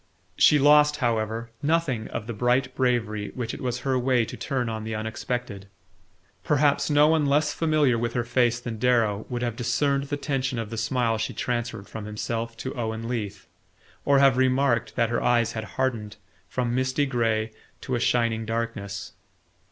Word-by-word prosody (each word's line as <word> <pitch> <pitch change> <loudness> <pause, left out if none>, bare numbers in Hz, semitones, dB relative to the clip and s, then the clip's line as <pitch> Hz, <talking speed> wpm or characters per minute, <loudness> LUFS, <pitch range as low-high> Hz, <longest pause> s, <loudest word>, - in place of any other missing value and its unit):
She 150 - +6
lost, 150 +1 +5
however, 115 -3 -1
nothing 145 -7 0
of 105 - -5
the 120 - -5
bright 125 +4 +1
bravery 115 -5 0
which 120 -2 -3
it - - -7
was 125 -1 -2
her 130 0 0
way 125 -2 +2
to - - -8
turn 130 -4 -2
on 110 -1 -4
the 110 0 -4
unexpected. 110 -1 -4 0.8
Perhaps 145 0 +2
no 145 0 +5
one 155 -2 +3
less 145 +2 +2
familiar 150 -7 +2
with 120 0 -2
her 120 - 0
face 120 0 +1
than 115 -2 -6
Darrow 110 -4 +1
would 120 -1 -3
have 120 -2 -2
discerned 140 +3 0
the 145 +1 -3
tension 135 -3 -2
of 115 -1 -4
the - - -4
smile 120 -4 0
she 110 - -3
transferred 120 -4 -3
from 110 -2 -7
himself 115 +2 -4
to 130 - -5
Owen 115 -1 -4
Leath, 105 -5 -4 0.6
or 140 -1 +4
have 135 -2 +5
remarked 130 -4 +2
that 115 - +2
her 120 - 0
eyes 120 -2 +2
had 110 -1 -5
hardened 115 -6 -1 0.3
from 120 +2 -1
misty 130 +3 +1
grey 115 -4 0 0.3
to 130 - -5
a 120 - +1
shining 115 -2 +1
darkness. 110 -4 -4
120 Hz, 175 wpm, -25 LUFS, 110-130 Hz, 0.8 s, She